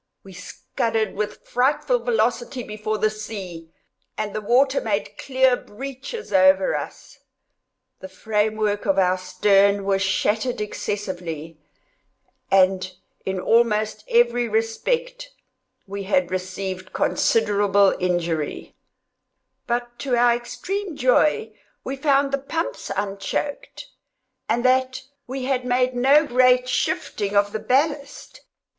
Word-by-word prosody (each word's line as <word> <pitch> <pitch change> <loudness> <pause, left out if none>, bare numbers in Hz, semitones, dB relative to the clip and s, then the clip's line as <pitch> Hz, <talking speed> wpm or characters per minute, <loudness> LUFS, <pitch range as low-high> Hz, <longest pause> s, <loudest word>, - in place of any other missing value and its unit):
We 195 - -13
scudded 220 +3 -3
with 210 +1 -5
frightful 250 -1 +1
velocity 240 +2 -1
before 215 0 -4
the 215 +1 +1
sea, 195 -6 -8 0.5
and 215 -1 -3
the 215 - -3
water 265 +6 +3
made 205 -2 -2
clear 260 -1 +3
breaches 270 - -8
over 190 0 +4
us. - - -7 0.8
The 190 - -9
frame 210 +2 -1
work 210 -1 -1
of 195 -1 +2
our 185 -1 +3
stern 200 +2 +3
was 195 -1 +1
shattered 210 +5 0
excessively, 175 -7 -5 0.9
and, 185 -1 +3 0.4
in 190 -1 -1
almost 215 0 +1
every 240 0 +3
respect, 485 - -1 0.6
we 200 +1 -6
had 275 +3 +1
received 185 0 -5
considerable 205 -3 +2
injury; 170 -4 -2 0.9
but 240 0 -3
to 265 -3 0
our 240 0 +4
extreme 355 +10 -4
joy 300 - +2 0.3
we 270 - -4
found 275 0 +2
the 275 - 0
pumps 325 +5 -4
unchoked, 200 +8 -4 0.6
and 240 +2 0
that 260 0 +2 0.2
we 260 +1 -5
had 260 -1 0
made 250 +1 +1
no 275 +5 +4
great 250 -1 +4
shifting 205 -4 -1
of 205 0 +2
our 215 - -3
ballast. 290 - -1
220 Hz, 115 wpm, -23 LUFS, 195-255 Hz, 0.9 s, over